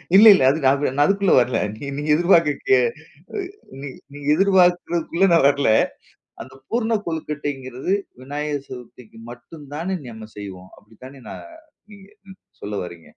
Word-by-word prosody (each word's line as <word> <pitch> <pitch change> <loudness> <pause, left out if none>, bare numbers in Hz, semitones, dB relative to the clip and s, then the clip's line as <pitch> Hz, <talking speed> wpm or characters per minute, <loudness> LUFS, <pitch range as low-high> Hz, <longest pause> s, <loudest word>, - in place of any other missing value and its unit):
இல்ல, 210 +3 +8
இல்ல 130 - +1 0.5
நான் 145 +1 +4
அதுக்குள்ள 195 0 +2
வரல. 120 -1 +1 0.4
நீ - - -3
எதிர்பாரக்ககு 170 - +3 0.6
அ - - -3 0.4
நீ 145 - -6 0.3
நீங்க 145 -1 -10
எதிர்பார்க்கிறதுக்குள்ள 180 -2 +2
நான் 165 -4 +4
வரல. 140 0 0 0.8
அந்த 130 +3 -14 0.2
பூர்ண 230 -1 0
கொழுக்கட்டைங்கிறது 145 -2 -4 0.3
விநாயகர் 145 +1 -4
சதுர்த்திக்கு 125 -2 -12
மட்டும் 145 +5 -12
தானே 180 +5 -3
நம்ம 110 -2 -10
செய்வோம். 95 -2 -9
அப்படி 110 +1 -21
தானே 135 0 -13
நா - - -7 0.6
நீங்க 200 -1 -15 0.2
ம் 190 - -14 0.2
சொல்ல 105 0 -5
வர்றீங்க? 85 -2 -11
145 Hz, 130 wpm, -21 LUFS, 125-180 Hz, 0.8 s, இல்ல